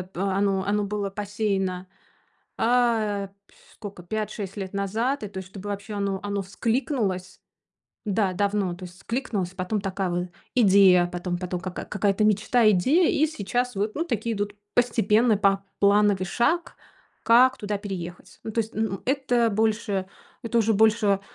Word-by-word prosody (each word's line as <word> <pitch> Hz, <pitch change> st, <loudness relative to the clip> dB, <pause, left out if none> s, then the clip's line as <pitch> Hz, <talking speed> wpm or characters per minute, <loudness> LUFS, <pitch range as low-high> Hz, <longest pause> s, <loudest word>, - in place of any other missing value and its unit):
э, 180 Hz, -, -8 dB
оно 195 Hz, 0 st, +1 dB
оно 205 Hz, 0 st, +1 dB
было 205 Hz, -1 st, -3 dB
посеяно, 195 Hz, -2 st, -2 dB, 0.7 s
а, 225 Hz, -4 st, +1 dB, 0.2 s
пьфь -, -, -25 dB, 0.2 s
скока 200 Hz, -4 st, -9 dB
5-6 210 Hz, 0 st, -4 dB
лет 190 Hz, -1 st, -5 dB
назад, 220 Hz, +7 st, -1 dB
и, -, -, -3 dB
то 190 Hz, -, -10 dB
есть, 185 Hz, -, -9 dB
чтобы 200 Hz, +1 st, -8 dB
вообще 205 Hz, +2 st, -5 dB
оно 200 Hz, -1 st, -1 dB
оно 200 Hz, -1 st, -2 dB
вскликнулось. 200 Hz, -, -2 dB, 0.7 s
Да, 195 Hz, -2 st, +1 dB
давно, 200 Hz, -2 st, 0 dB
то 180 Hz, +1 st, -10 dB
есть 180 Hz, 0 st, -11 dB
вскликнулось, 210 Hz, -4 st, -3 dB
потом- 185 Hz, +3 st, -2 dB
такая 195 Hz, -1 st, -2 dB
вот 175 Hz, +1 st, -2 dB, 0.3 s
идея, 190 Hz, -6 st, +6 dB
потом 175 Hz, 0 st, -4 dB
потом- 180 Hz, -1 st, -4 dB
ка 185 Hz, +1 st, -5 dB
какая-то 200 Hz, 0 st, 0 dB
мечта, 215 Hz, +2 st, +3 dB
идея, 275 Hz, -, +3 dB
и 310 Hz, -, +3 dB
сейчас 245 Hz, -2 st, -2 dB
вот, 210 Hz, +2 st, -1 dB
ну, 325 Hz, -, -1 dB
такие 230 Hz, -, -2 dB
идут 205 Hz, 0 st, -3 dB, 0.2 s
постепенно, 230 Hz, -1 st, +3 dB
поплановый 200 Hz, 0 st, +2 dB
шаг, 335 Hz, -, 0 dB, 0.5 s
как 250 Hz, +3 st, +5 dB
туда 205 Hz, -1 st, -3 dB
переехать. 180 Hz, -4 st, -7 dB
Ну, -, -, -4 dB
то 230 Hz, -, +1 dB
есть, 220 Hz, 0 st, -5 dB
н 220 Hz, -, +1 dB
н -, -, -8 dB
это 250 Hz, -4 st, +2 dB
больше, 210 Hz, -2 st, 0 dB, 0.4 s
это 235 Hz, 0 st, 0 dB
уже 225 Hz, 0 st, +2 dB
больше 210 Hz, -2 st, +3 dB
205 Hz, 155 wpm, -25 LUFS, 190-225 Hz, 0.7 s, идея